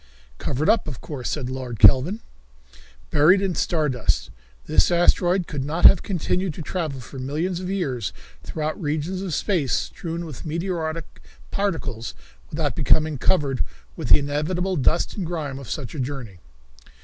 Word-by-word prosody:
"Covered 145 Hz, +5 st, -1 dB
up, 225 Hz, -, +3 dB
of 135 Hz, -6 st, -5 dB
course," 135 Hz, -5 st, -5 dB
said 140 Hz, -5 st, -2 dB
Lord 130 Hz, -2 st, -5 dB
Kelvin. 135 Hz, -, +6 dB, 0.9 s
"Buried 160 Hz, +6 st, +6 dB
in 195 Hz, -2 st, 0 dB
star 160 Hz, -2 st, +1 dB
dust. 125 Hz, -, 0 dB, 0.3 s
This 80 Hz, +4 st, +4 dB
asteroid 175 Hz, +1 st, +3 dB
could 145 Hz, -4 st, -4 dB
not 160 Hz, +5 st, 0 dB
have 185 Hz, -, +9 dB
continued 180 Hz, -2 st, -1 dB
to 165 Hz, -, -6 dB
travel 155 Hz, -6 st, -3 dB
for 130 Hz, +2 st, -9 dB
millions 160 Hz, +7 st, -2 dB
of 185 Hz, 0 st, -5 dB
years 135 Hz, -, -1 dB, 0.3 s
through 155 Hz, 0 st, -3 dB
regions 160 Hz, +2 st, -2 dB
of 190 Hz, -3 st, -4 dB
space 165 Hz, -, 0 dB
strewn 170 Hz, 0 st, -3 dB
with 150 Hz, -7 st, -8 dB
meteoric 165 Hz, -1 st, -3 dB, 0.3 s
particles 145 Hz, -, -2 dB, 0.3 s
without 150 Hz, -6 st, -1 dB
becoming 150 Hz, +1 st, +2 dB
covered 140 Hz, -7 st, +2 dB, 0.3 s
with -, -, -5 dB
the -, -, +8 dB
inevitable 155 Hz, +6 st, -1 dB
dust 160 Hz, +3 st, +1 dB
and 190 Hz, -, -2 dB
grime 150 Hz, -6 st, -4 dB
of 135 Hz, -, -9 dB
such 140 Hz, -8 st, -4 dB
a 150 Hz, -, -6 dB
journey. 125 Hz, -8 st, -5 dB
155 Hz, 155 wpm, -24 LUFS, 135-175 Hz, 0.9 s, have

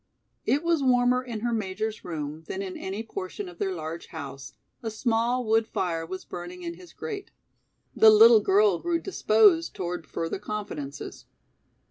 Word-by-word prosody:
It 290 Hz, +4 st, +2 dB
was 335 Hz, -3 st, +2 dB
warmer 250 Hz, -1 st, +3 dB
in 235 Hz, -4 st, -6 dB
her 240 Hz, 0 st, 0 dB
Major's 215 Hz, +1 st, -3 dB
room 155 Hz, -2 st, -5 dB
than 195 Hz, -, -4 dB
in 190 Hz, -1 st, -6 dB
any 195 Hz, +4 st, -4 dB
portion 195 Hz, -2 st, -6 dB
of 175 Hz, -1 st, -12 dB
their 195 Hz, -, 0 dB
large 160 Hz, +1 st, -6 dB
house; 140 Hz, -4 st, -8 dB, 0.3 s
a 225 Hz, -, -3 dB
small 235 Hz, +2 st, 0 dB
wood 220 Hz, 0 st, +2 dB
fire 165 Hz, -3 st, -2 dB
was 185 Hz, +2 st, -6 dB
burning 175 Hz, +1 st, -8 dB
in 170 Hz, 0 st, -4 dB
his 175 Hz, -1 st, -14 dB
grate. 410 Hz, -3 st, -6 dB, 0.7 s
The 220 Hz, -, +8 dB
little 220 Hz, +1 st, +8 dB
girl 200 Hz, -2 st, +4 dB
grew 345 Hz, -1 st, 0 dB
disposed 365 Hz, -1 st, +3 dB
toward 175 Hz, -4 st, -4 dB
further 165 Hz, +5 st, -3 dB
confidences. 200 Hz, -10 st, -6 dB
205 Hz, 160 wpm, -27 LUFS, 175-235 Hz, 0.7 s, The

